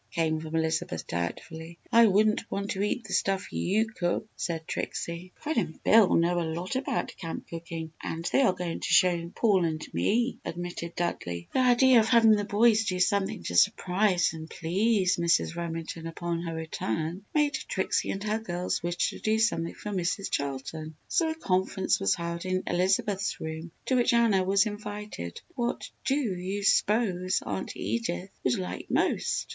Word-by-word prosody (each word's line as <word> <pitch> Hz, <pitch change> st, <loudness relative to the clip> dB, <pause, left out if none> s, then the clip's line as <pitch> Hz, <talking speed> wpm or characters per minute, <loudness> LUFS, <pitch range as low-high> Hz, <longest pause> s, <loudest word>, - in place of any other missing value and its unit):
came 160 Hz, -2 st, 0 dB
from 160 Hz, 0 st, -6 dB
Elizabeth, 160 Hz, -, -1 dB
doubtfully. 160 Hz, -, -5 dB
"I 230 Hz, -1 st, +7 dB
wouldn't 215 Hz, +2 st, +2 dB
want 200 Hz, +1 st, -3 dB
to 195 Hz, -, -2 dB
eat 210 Hz, +4 st, 0 dB
the 200 Hz, -, -7 dB
stuff 195 Hz, -, 0 dB
you 195 Hz, -, +1 dB
cook!" 210 Hz, -1 st, -2 dB
said 165 Hz, -2 st, -3 dB
Trixie. 170 Hz, +2 st, -4 dB
"Fred 310 Hz, -2 st, -3 dB
and 170 Hz, -8 st, -2 dB
Bill 220 Hz, -3 st, +6 dB
know 175 Hz, +1 st, +2 dB
a 165 Hz, -2 st, -2 dB
lot 180 Hz, +7 st, -4 dB
about 260 Hz, -, -2 dB
camp 165 Hz, -2 st, -6 dB
cooking 165 Hz, -1 st, -6 dB
and 165 Hz, +1 st, -4 dB
they -, -, +4 dB
are 255 Hz, -, +5 dB
going 175 Hz, -2 st, -4 dB
to -, -, -3 dB
show 175 Hz, -2 st, +3 dB
Paul 200 Hz, -6 st, +3 dB
and 155 Hz, -2 st, -2 dB
me," 230 Hz, -, +1 dB
admitted 175 Hz, 0 st, -5 dB
Dudley. 85 Hz, -, -3 dB
The -, -, +2 dB
idea 255 Hz, 0 st, +6 dB
of 220 Hz, -, +2 dB
having 230 Hz, -3 st, +6 dB
the 205 Hz, -1 st, +3 dB
boys 220 Hz, +2 st, +4 dB
do 185 Hz, -2 st, -1 dB
something 195 Hz, -, +1 dB
to 90 Hz, -, -4 dB
surprise 180 Hz, -, +3 dB
and 160 Hz, 0 st, -8 dB
please 190 Hz, +3 st, +1 dB
Mrs. 170 Hz, 0 st, +2 dB
Remington 165 Hz, -1 st, -5 dB
upon 170 Hz, 0 st, -3 dB
her 165 Hz, -1 st, -4 dB
return, 160 Hz, -, -3 dB
made 295 Hz, -1 st, +3 dB
Trixie -, -, -1 dB
and 195 Hz, -, -3 dB
her 215 Hz, +1 st, 0 dB
girls 180 Hz, -4 st, -2 dB
wish 175 Hz, 0 st, 0 dB
to -, -, -9 dB
do 220 Hz, 0 st, +1 dB
something 195 Hz, -7 st, 0 dB
for 210 Hz, -, -6 dB
Mrs. 190 Hz, +1 st, -1 dB
Charlton. 140 Hz, +3 st, -3 dB
So 330 Hz, -3 st, +2 dB
a 320 Hz, -, -2 dB
conference 190 Hz, -8 st, 0 dB
was 95 Hz, -, +2 dB
held 170 Hz, 0 st, -4 dB
in 185 Hz, 0 st, -1 dB
Elizabeth's 190 Hz, +2 st, 0 dB
room 160 Hz, +1 st, -5 dB, 0.2 s
to -, -, 0 dB
which 245 Hz, -1 st, +3 dB
Anna 220 Hz, -5 st, +4 dB
was 195 Hz, +3 st, +3 dB
invited. 205 Hz, -, -6 dB
"What 240 Hz, -2 st, -3 dB
do 275 Hz, -3 st, +2 dB
you 200 Hz, -6 st, -2 dB
s'pose 195 Hz, -3 st, +2 dB
Aunt -, -, -4 dB
Edith 200 Hz, -5 st, -2 dB
would 125 Hz, -, +2 dB
like 90 Hz, 0 st, -5 dB
most?" -, -, +1 dB
185 Hz, 175 wpm, -28 LUFS, 165-215 Hz, 0.2 s, I